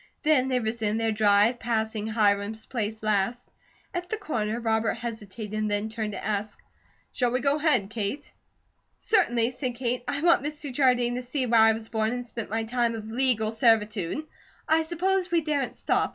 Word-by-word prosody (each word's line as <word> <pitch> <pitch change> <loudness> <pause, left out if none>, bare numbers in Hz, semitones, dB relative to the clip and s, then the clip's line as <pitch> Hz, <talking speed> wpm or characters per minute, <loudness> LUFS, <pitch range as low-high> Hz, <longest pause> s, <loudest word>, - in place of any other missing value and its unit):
Then 295 -4 +3
they 255 -1 +1
resumed 220 -1 -1
their 225 -1 +1
drive, 210 +2 +3
passing 220 -2 -1
Hiram's 215 0 +1
place 220 -2 -4
last. 215 +3 0 0.5
At 355 -1 -4
the 440 - -2
corner 230 - -2
Robert 220 -1 +1
hesitated 215 -2 -4
and 205 +2 -1
turned 215 -2 -3
to - - -6
ask: 210 0 -2 0.6
"Shall 245 -2 +1
we 250 +1 0
go 280 +3 +2
ahead, 295 -10 +2
Kate?" 220 +6 -3 0.6
"Certainly," 240 - +2
said 250 -1 -4
Kate. 245 0 -1
"I 285 - -1
want 340 +1 +5
Mr. 295 -1 -4
Jardine 245 -3 +3
to - - -3
see 255 +2 -2
where 230 -2 +4
I 220 0 +6
was 220 0 -7
born 220 0 0
and 245 0 -4
spent 230 -2 -6
my 225 +1 -1
time 235 0 0
of 220 0 -7
legal 235 -3 +1
servitude. 225 - +1 0.4
I 320 +1 +4
suppose 360 +3 0
we 340 -1 +2
daren't 295 -4 -1
stop. - - +1
230 Hz, 180 wpm, -26 LUFS, 215-260 Hz, 0.6 s, I